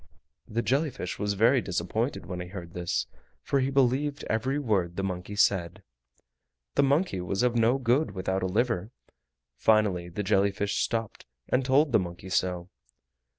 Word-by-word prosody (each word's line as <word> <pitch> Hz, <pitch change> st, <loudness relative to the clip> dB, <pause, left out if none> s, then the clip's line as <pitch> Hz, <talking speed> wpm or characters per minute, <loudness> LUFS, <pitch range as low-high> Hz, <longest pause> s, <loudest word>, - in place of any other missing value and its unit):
The 115 Hz, +1 st, -2 dB
jelly 140 Hz, +8 st, +1 dB
fish 135 Hz, -, -6 dB
was 105 Hz, -1 st, -1 dB
very 115 Hz, +5 st, +4 dB
disappointed 100 Hz, +8 st, -2 dB
when 90 Hz, +1 st, -5 dB
he 90 Hz, -, -5 dB
heard 90 Hz, -2 st, -8 dB
this, 90 Hz, -1 st, -1 dB, 0.4 s
for 140 Hz, -, +1 dB
he 130 Hz, 0 st, +1 dB
believed 135 Hz, +2 st, +1 dB
every 130 Hz, +6 st, -1 dB
word 100 Hz, -11 st, 0 dB
the 95 Hz, -, -2 dB
monkey 95 Hz, +1 st, -4 dB
said. 95 Hz, -2 st, +1 dB, 0.9 s
The -, -, +3 dB
monkey 140 Hz, -, +1 dB
was 95 Hz, +5 st, -1 dB
of 125 Hz, -1 st, +2 dB
no 115 Hz, +3 st, +3 dB
good 130 Hz, +4 st, +2 dB
without 95 Hz, 0 st, -2 dB
a 95 Hz, -, 0 dB
liver. 105 Hz, 0 st, 0 dB, 0.7 s
Finally 100 Hz, -5 st, +2 dB
the 95 Hz, +4 st, -4 dB
jelly 95 Hz, +1 st, +3 dB
fish 100 Hz, 0 st, -2 dB
stopped 115 Hz, -, -2 dB, 0.2 s
and 130 Hz, -, +2 dB
told 140 Hz, +3 st, +3 dB
the 115 Hz, -, +5 dB
monkey 85 Hz, 0 st, -6 dB
so. 90 Hz, -1 st, -1 dB
105 Hz, 165 wpm, -28 LUFS, 90-125 Hz, 0.9 s, the